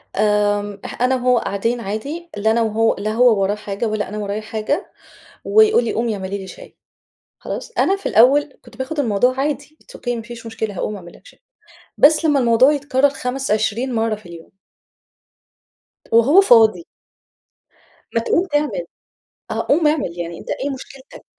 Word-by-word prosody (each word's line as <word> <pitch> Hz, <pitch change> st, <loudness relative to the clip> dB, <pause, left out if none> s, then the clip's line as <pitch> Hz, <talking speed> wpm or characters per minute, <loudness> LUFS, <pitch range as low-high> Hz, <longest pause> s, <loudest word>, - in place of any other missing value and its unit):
آآ، 205 Hz, 0 st, +1 dB, 0.2 s
أنا 255 Hz, +1 st, +3 dB
وهو 250 Hz, -1 st, +2 dB
قاعدين 230 Hz, +3 st, -1 dB
عادي، 275 Hz, -, -5 dB
لا 220 Hz, +2 st, +2 dB
أنا 230 Hz, +1 st, +2 dB
وهو 225 Hz, 0 st, +1 dB
لا 215 Hz, +1 st, -2 dB
هو 230 Hz, -3 st, +4 dB
وراه 195 Hz, +2 st, +1 dB
حاجة 210 Hz, +1 st, -4 dB
ولا 215 Hz, -3 st, -2 dB
أنا 210 Hz, -, -6 dB
ورايا 205 Hz, 0 st, -3 dB
حاجة، 220 Hz, -, -3 dB, 0.5 s
ويقول 435 Hz, -, +4 dB
لي 230 Hz, -, -2 dB
قومي 230 Hz, -1 st, -1 dB
اعملي 195 Hz, 0 st, -5 dB
لي 190 Hz, -, -8 dB
شاي، -, -, -13 dB, 0.6 s
خلاص؟ 475 Hz, -, -7 dB
أنا 390 Hz, -, +3 dB
في 395 Hz, -, -9 dB
الأول 275 Hz, +5 st, +4 dB
كنت 240 Hz, -2 st, -16 dB
باخد 265 Hz, +4 st, -3 dB
الموضوع 250 Hz, +1 st, +1 dB
عادي 295 Hz, +2 st, -3 dB
it's -, -, -14 dB
Okay -, -, -8 dB
ما 230 Hz, -, -6 dB
فيش 235 Hz, 0 st, -10 dB
مشكلة، 220 Hz, -2 st, -4 dB
هاقوم 210 Hz, -, -3 dB
أعمل 175 Hz, -3 st, -12 dB
لك -, -, -23 dB
شاي -, -, -18 dB, 0.6 s
بس 310 Hz, +3 st, +5 dB
لمّا 290 Hz, -3 st, +3 dB
الموضوع 245 Hz, +3 st, +4 dB
يتكرّر 285 Hz, -1 st, +1 dB
خَمَس 270 Hz, 0 st, -4 dB
عشرين 220 Hz, +4 st, 0 dB
مرّة 225 Hz, -1 st, 0 dB
في 210 Hz, -2 st, -13 dB
اليوم. 170 Hz, -1 st, -12 dB, 1.6 s
وهو 260 Hz, +12 st, +6 dB
فاضي. 235 Hz, -, +4 dB, 1.3 s
ما 230 Hz, -, +2 dB
تقوم 340 Hz, +10 st, +1 dB
تعمل، 300 Hz, +11 st, -1 dB, 0.7 s
آه، -, -, -2 dB
قوم 310 Hz, +2 st, +3 dB
أعمل 275 Hz, -, 0 dB
يعني 170 Hz, 0 st, -5 dB
أنتَ -, -, -10 dB
إيه 280 Hz, +2 st, -2 dB
مشكلتك؟ 265 Hz, 0 st, -11 dB
235 Hz, 170 wpm, -19 LUFS, 210-285 Hz, 1.6 s, وهو